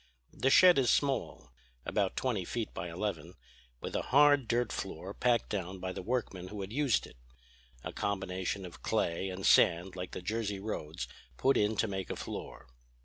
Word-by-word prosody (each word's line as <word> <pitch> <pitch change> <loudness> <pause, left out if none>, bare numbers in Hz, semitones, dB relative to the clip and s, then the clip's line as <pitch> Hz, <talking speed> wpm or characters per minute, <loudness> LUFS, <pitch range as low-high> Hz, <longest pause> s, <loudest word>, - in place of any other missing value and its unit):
The 135 - +1
shed 180 +2 +7
is 125 - +2
small, 140 - 0 0.3
about 100 -2 0
twenty 120 -8 0
feet 115 +5 -4
by 85 +1 -5
eleven, 85 -2 -4 0.5
with - - -5
a - - +1
hard 145 -2 +5
dirt 120 +1 +1
floor - - -5
packed 120 -2 +1
down 95 -2 -3
by 95 0 -3
the - - -5
workmen 95 -4 -2
who 105 +1 -6
had 95 +3 -6
used 140 -5 +2
it; - - -15 0.7
a - - -5
combination 95 -1 -2
of 90 - -11
clay 85 +3 0
and 95 +1 -5
sand 90 +2 +4
like 90 -1 -6
the 90 - -6
Jersey 105 0 -2
roads 80 - -4 0.3
put 135 - +3
in 105 +1 +2
to 115 - +2
make 95 -2 -4
a - - -2
floor. - - -7
100 Hz, 180 wpm, -32 LUFS, 90-120 Hz, 0.7 s, shed